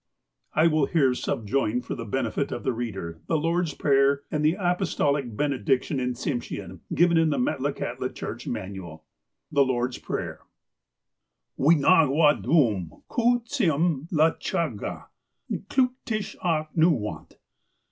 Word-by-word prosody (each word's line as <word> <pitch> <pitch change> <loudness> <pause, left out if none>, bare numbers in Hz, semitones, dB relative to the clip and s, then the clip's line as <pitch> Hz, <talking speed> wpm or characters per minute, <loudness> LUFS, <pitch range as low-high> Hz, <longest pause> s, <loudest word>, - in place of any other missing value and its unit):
I 155 - +4
will 155 -4 +3
here 140 -7 +3
subjoin, 120 0 -1
for - - -5
the 115 - -6
benefit 130 +4 -2
of - - -4
the 130 - 0
reader, 95 -9 -5
the 160 - +2
Lord's 165 0 0
Prayer, 140 0 +3
and 150 -1 -1
the 155 +3 +3
Apostolic 150 - 0
Benediction 135 0 0
in 125 0 -1
Tsim 120 0 -2
shean, - - -7
given 170 -1 +4
in 165 -1 +4
the 145 - 0
Metlakahtla 135 +3 -2
Church - - -6
Manual: 90 -5 -6 0.5
The 145 -2 +3
Lord^s 125 -1 -1
Prayer - - -4 0.6
" - - -58
Wee 155 +5 +5
Nahgwah 150 -1 +4
dum 110 - +1
koo 240 0 +2
tsim 170 - 0
lachahgah, 160 - 0 0.5
IS'clootiksh 250 -2 -1
ah 160 -3 +1
N'oo 160 -4 +4
wahut. 85 -6 -6
145 Hz, 135 wpm, -26 LUFS, 125-165 Hz, 0.6 s, Wee